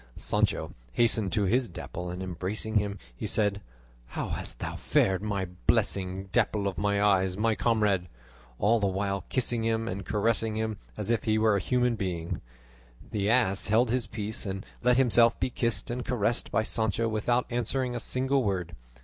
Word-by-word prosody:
Sancho - - 0 0.2
hastened 110 - +2
to 105 - +2
his 120 +5 +1
Dapple, 90 +1 -6
and 90 +1 -5
embracing 95 +5 -1
him 100 0 -3 0.2
he - - -4
said, 105 -2 +1 0.5
"How - - -4
hast - - -5
thou - - -5
fared, 95 -1 +2
my 100 -3 -1 0.2
blessing, 95 0 +1
Dapple 100 -2 +1
of 95 - -3
my 100 0 +1
eyes, 95 -2 +3
my 110 +1 +2
comrade?" 105 -4 +1 0.5
all 115 - +3
the 100 - +1
while 100 +1 -2
kissing 120 -3 +1
him 115 0 0
and 100 -2 -4
caressing 110 +2 0
him 110 -1 -2 0.2
as 105 +1 -1
if 115 -2 0
he 110 -1 +2
were 110 -1 +3
a - - +2
human 125 0 +1
being. 90 -5 -3 0.7
The 105 -1 0
ass 110 -5 +3
held 110 +3 +3
his 125 -3 0
peace, 110 0 -2
and 95 -1 -5 0.2
let 125 0 +4
himself 120 -2 +4
be 130 - -1
kissed 115 -4 -1
and 125 +1 -3
caressed 120 -1 0
by 110 - +1
Sancho 110 +1 0
without 115 +3 +1
answering 120 +2 -1
a - - -2
single 130 +1 +1
word. 90 -5 -2
110 Hz, 175 wpm, -28 LUFS, 100-115 Hz, 0.7 s, let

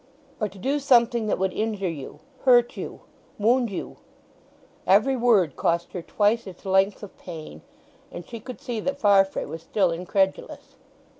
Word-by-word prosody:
"Or 215 -2 -1
to 195 - -15
do 275 +9 -1
something—that 235 -5 +3
would 190 0 -1
injure 210 -3 -2
you—hurt 170 - 0
you—wound 235 +3 -2
you." 195 - -6 0.9
Every 215 +8 +4
word 220 - +3
cost 170 0 -1
her 180 - -4
twice 210 +5 +1
its 185 0 -12
length 190 +2 +2
of 205 - -10
pain. 155 - -9 0.5
And 175 - -8
she 230 - -8
could 250 +3 -9
see 240 -3 -4
that 275 +5 -2
Farfrae 195 -3 +3
was 160 - -7
still 185 +1 +1
incredulous. 190 +3 -2
205 Hz, 145 wpm, -25 LUFS, 185-235 Hz, 0.9 s, Every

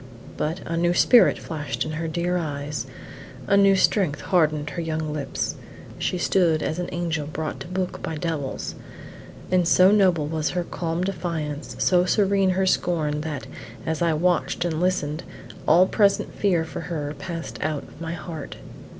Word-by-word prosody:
But 160 +4 -2
a 165 - -2
new 175 +1 +2
spirit 245 +5 +6
flashed 155 -3 -4
in 155 - -4
her 165 +1 -3
dear 175 +2 -1
eyes, 145 -4 -3 0.6
a 200 - +3
new 195 -1 +6
strength 185 -6 +2
hardened 155 -5 +1
her 170 - -3
young 155 -2 -2
lips. 145 -3 -2 0.5
She 180 - -1
stood 170 -3 +2
as 160 - -2
an 180 - -3
angel 165 -4 -2
brought 155 0 -4
to - - -7
book 185 0 -3
by 160 - -3
devils; 155 -4 -3 0.8
and 180 -2 +3
so 185 +2 +6
noble 185 -7 +4
was 155 0 -1
her 180 0 -1
calm 170 0 -3
defiance, 165 -6 -3
so 180 -1 +4
serene 195 0 +3
her 190 +1 +2
scorn, 155 -5 +1
that, 150 -4 -4 0.4
as 160 0 -2
I 170 -1 +3
watched 175 +1 +1
and 165 -1 -1
listened; 175 -4 0 0.5
all 175 +4 +7
present 200 +1 +2
fear 175 -5 +1
for 160 - -6
her 155 -4 -4
passed 165 +1 -6
out 155 -2 -1
of - - -15
my 165 0 -3
heart. 170 -2 -7
165 Hz, 165 wpm, -24 LUFS, 155-180 Hz, 0.8 s, all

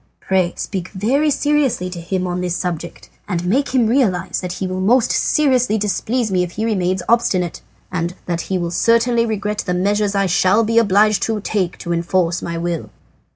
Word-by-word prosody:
Pray 185 -2 0
speak 185 -3 -4
very 260 +10 +1
seriously 285 -9 +1
to 180 -2 -7
him 185 +2 -2
on 180 0 -2
this 175 -1 -1
subject, 170 -2 -5 0.2
and 175 -3 -2
make 255 +10 +1
him 250 -3 +2
realize 195 -7 +1
that 180 -1 -4
he 190 - -4
will 185 0 -3
most 230 +5 +3
seriously 255 -7 +2
displease 215 +2 -1
me 185 -1 +2
if 175 -1 -3
he 220 - -2
remains 185 -4 0
obstinate, 200 -7 +1 0.3
and 175 -1 -2
that 170 -1 -2
he 190 - +1
will 170 -1 -3
certainly 230 +4 +2
regret 210 -1 -2
the 180 - -1
measures 205 +2 0
I 195 0 +2
shall 190 +4 +3
be 230 +1 +3
obliged 210 -1 +3
to 220 -1 -1
take 195 -4 -2
to 170 - -3
enforce 170 0 0
my 170 0 -4
will." 170 -1 -3
190 Hz, 190 wpm, -19 LUFS, 180-225 Hz, 0.3 s, most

